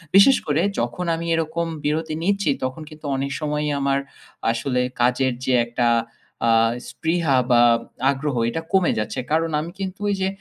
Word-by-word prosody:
বিশেষ 230 +8 +8
করে 150 +2 +2 0.2
যখন 120 +10 -2
আমি 165 +1 -5
এরকম 165 +1 -1 0.2
বিরতি 155 +1 -1
নিচ্ছি 200 -3 +1
তখন 130 +4 -3
কিন্তু 155 -1 -13
অনেক 135 +1 -2
সময়ই 150 -1 -1
আমার 140 0 +1 0.5
আসলে 125 +2 -1 0.2
কাজের 125 +1 +2
যে 130 - +1
একটা 120 0 0 0.6
আ - - +5 0.4
স্পৃহা 160 -5 +1
বা 120 -1 +6 0.5
আগ্রহ 140 0 -2
এটা 165 - -3
কমে 190 -3 +4
যাচ্ছে। 105 +5 -3
কারণ 160 +1 +1
আমি 165 +3 -5
কিন্তু 190 0 -4
ওই - - +2
যে 190 - +2
150 Hz, 160 wpm, -22 LUFS, 130-165 Hz, 0.6 s, বিশেষ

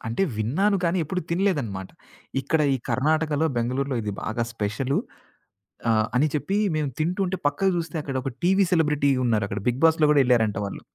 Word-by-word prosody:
అంటే 115 +10 -1
విన్నాను 160 - +1
కానీ 170 +2 +1
ఎప్పుడు 180 +5 -3
తినలేదన్నమాట. 145 - -1 0.5
ఇక్కడ 155 +4 0
ఈ - - +1
కర్ణాటకలో 155 +2 +1
బెంగుళూరులో 130 +3 -1
ఇది 105 -1 -3
బాగా 110 +2 -2
స్పెషలు 115 +5 -1 0.9
ఆహ్, 110 -1 +3
అని 140 +5 +4
చెప్పి 190 +7 -1 0.2
మేము 150 -2 0
తింటుంటే 185 +4 0
పక్కకు 190 +7 +1
జూస్తే 170 -2 -3
అక్కడ 140 -2 -5
ఒక 135 - -3
టీవీ 190 +2 +4
సెలబ్రిటీ 150 -4 +2
ఉన్నారక్కడ 105 -3 0
'బిగ్ 125 +3 0
బాస్‌లో' 160 -2 +4
గూడా 145 -2 +5
యెళ్లారంట 115 -5 +2
వాళ్ళు. 100 - -6
145 Hz, 160 wpm, -24 LUFS, 115-165 Hz, 0.9 s, గూడా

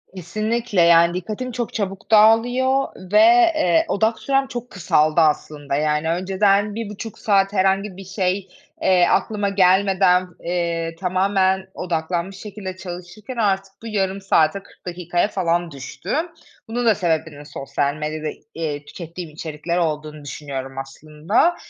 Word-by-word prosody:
Kesinlikle, 215 +3 -1
yani, 170 0 +6
dikkatim 215 +8 -4
çok 240 -1 -4
çabuk 195 -1 -4
dağılıyor 245 +5 +4 0.2
ve, 320 - +6 0.4
eee, 325 +1 +3
odak 220 -1 +1
sürem 270 0 +1
çok 245 -1 -6
kısaldı 155 -3 +2
aslında, 150 -2 0
yani, 150 +2 0
önceden 195 +3 +1
1.5 220 0 -6
saat 195 -1 +2
herhangi 195 0 +1
bir 195 - -9
şey, 190 0 -1 0.3
eee, 180 -2 +4
aklıma 205 -2 +1
gelmeden, 185 -1 +3 0.2
eee, 170 -1 -2
tamamen 190 0 +1
odaklanmış 175 +2 -2
şekilde 200 -2 -7
çalışırken 185 +6 -8
artık 195 -3 0
bu - - -6
0.5 195 -2 -1
saate, 190 0 +2
40 - - -22
dakikaya 175 +1 -1
falan 175 -4 -1
düştü. 140 +8 -7 0.6
Bunun 240 +2 -2
da 220 -2 +5
sebebinin 160 -5 -2
sosyal 140 0 -2
medyada, 155 0 -4 0.3
eee, 150 -3 -4
tükettiğim 170 +1 -8
içerikler 155 +2 -4
olduğunu 155 -2 -2
düşünüyorum 135 -2 -6
aslında 155 - 0
185 Hz, 130 wpm, -21 LUFS, 165-205 Hz, 0.6 s, yani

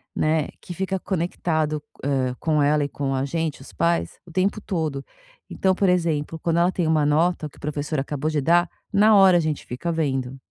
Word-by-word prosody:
né, 155 -1 +1
que 175 - -8
fica 190 +1 -2
conectado, 160 -4 -1 0.2
hã, 130 -3 0
com 155 -2 +1
ela 145 +1 +3
e 140 - -2
com 135 -1 -2
a 130 - 0
gente, 160 -1 -3
os - - -12
pais, 170 0 0
o 170 - -14
tempo 190 +4 0
todo. 155 -8 -3 0.5
Então, 190 -1 +1
por 195 +1 +1
exemplo, 165 -3 0
quando 165 +1 0
ela 175 +2 +3
tem 175 -3 -1
uma 155 -2 +3
nota 155 +1 +1
que - - -22
o - - -16
professor 150 0 -2
acabou 145 +2 -2
de 150 -2 0
dar, 175 +3 +3 0.2
na 215 +1 +5
hora 190 -3 +7
a - - +3
gente 155 -2 -2
fica 150 +8 -3
vendo. 135 -5 -1
160 Hz, 205 wpm, -23 LUFS, 145-175 Hz, 0.5 s, hora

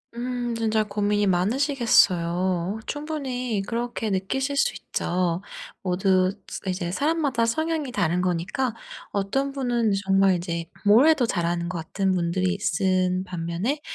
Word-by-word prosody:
음. 245 -1 -3
진짜 220 -1 +1
고민이 205 0 0
많으시겠어요. 185 - +2
충분히 265 -7 -3
그렇게 235 -1 -2
느끼실 265 +9 -1
수 485 - +2
있죠. 175 -1 -2 0.4
모두 185 0 +2 0.2
스 - - -6
이제 180 -2 -2
사람마다 285 - +1
성향이 315 +3 -1
다른 180 -5 +1
거니까 185 +8 -1 0.4
어떤 240 +8 -1
분은 240 -5 0
정말 195 -1 +4
이제 170 -1 -3 0.2
뭘 220 +8 +6
해도 310 -7 +4
잘하는 170 -2 -1
것 180 - -4
같은 190 +4 -1
분들이 180 +2 0
있는 185 -1 +1
반면에 180 - -3
200 Hz, 285 characters per minute, -25 LUFS, 180-250 Hz, 0.4 s, 뭘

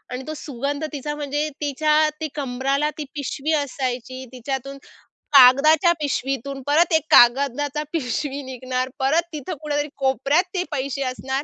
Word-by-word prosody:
अन् 260 +1 -7
तो 310 - -4
सुगंध 285 +2 -3
तिचा. 295 +1 -4
म्हणजे 295 +1 -2
तिच्या 300 +1 +1 0.2
ती 315 - -2
कंबराला 275 +2 -1
ती 300 - -3
पिशवी 290 +2 -2
असायची. 255 -1 -4
तिच्यातून 270 +2 -5 0.6
कागदाच्या 290 +6 +7
पिशवीतून 275 -1 -3
परत 325 +4 +3
एक 320 - +4
कागदाचा 280 +4 +4
पिशवी 285 0 -2
निघणार. 255 0 -3
परत 285 +6 +3
तिथं 305 +4 -5
कुठेतरी 295 -1 -2
कोपऱ्यात 275 - +2
ते 360 -1 0
पैसे 275 0 -3
असणार 265 +2 -3
280 Hz, 135 wpm, -22 LUFS, 260-300 Hz, 0.6 s, कागदाच्या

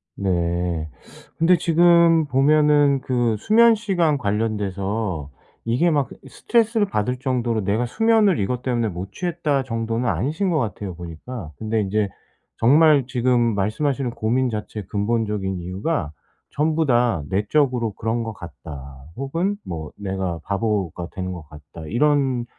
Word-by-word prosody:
네. 85 -3 -1 0.5
근데 170 +2 +4
지금 170 -1 +4
보면은 145 0 +4
그 120 -3 0
수면 230 - +5
시간 180 -8 +1
관련돼서 100 - -2 0.4
이게 120 +10 +2
막 145 -3 +1 0.2
스트레스를 225 -2 +1
받을 125 - -1
정도로 125 -4 -1
'내가 105 +5 0
수면을 215 - +3
이것 120 +5 -1
때문에 120 -3 0
못 95 +1 -6
취했다.' 160 - -1
정도는 115 0 -2
아니신 160 - -1
것 165 -3 +1
같아요, 100 -6 -4
보니까. 85 +3 -8
근데 110 0 -1
인제 100 +1 0 0.5
정말 145 +2 +5
지금 120 -3 +1
말씀하시는 125 +6 -1
고민 125 +3 0
자체의 105 -2 -5
근본적인 105 -2 -1
이유가 90 - -3 0.4
전부 155 +2 0
다 120 - +2
'내적으로 115 +2 +1
그런 115 +3 -2
것 115 -1 -5
같다.' 70 -6 -10
혹은 165 +9 -1
뭐 80 -3 -6
'내가 95 -4 -3
바보가 100 -5 -2
되는 95 -1 -4
것 85 -5 -8
같다.' 75 +2 -12
이런 135 - +1
115 Hz, 290 characters per minute, -22 LUFS, 95-145 Hz, 0.5 s, 수면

